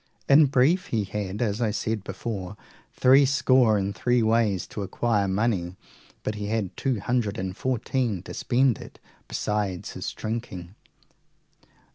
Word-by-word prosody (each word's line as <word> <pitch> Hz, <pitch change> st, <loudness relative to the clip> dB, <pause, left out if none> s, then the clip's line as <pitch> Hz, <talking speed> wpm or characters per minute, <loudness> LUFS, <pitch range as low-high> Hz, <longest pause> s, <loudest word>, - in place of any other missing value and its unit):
In 145 Hz, +2 st, +7 dB
brief, 145 Hz, +9 st, +2 dB
he 110 Hz, -3 st, 0 dB
had, 100 Hz, +2 st, -3 dB
as 105 Hz, 0 st, -1 dB
I 115 Hz, -, +2 dB
said 110 Hz, 0 st, -2 dB
before, 95 Hz, -1 st, -5 dB, 0.3 s
three 135 Hz, +2 st, +5 dB
score 130 Hz, -5 st, +4 dB
and 100 Hz, 0 st, -1 dB
three 120 Hz, +1 st, +1 dB
ways 110 Hz, -5 st, +2 dB
to 105 Hz, -, -5 dB
acquire 105 Hz, +1 st, 0 dB
money, 95 Hz, -3 st, 0 dB, 0.5 s
but 105 Hz, -, -2 dB
he 105 Hz, -1 st, -5 dB
had 105 Hz, -4 st, -2 dB
two 130 Hz, -5 st, -1 dB
hundred 120 Hz, -2 st, -1 dB
and 95 Hz, 0 st, -4 dB
fourteen 120 Hz, -5 st, -1 dB
to -, -, -8 dB
spend 130 Hz, -1 st, +1 dB
it, -, -, -12 dB, 0.3 s
besides 105 Hz, -4 st, -2 dB
his -, -, -5 dB
drinking. 110 Hz, -6 st, -5 dB
110 Hz, 145 wpm, -25 LUFS, 100-125 Hz, 0.5 s, In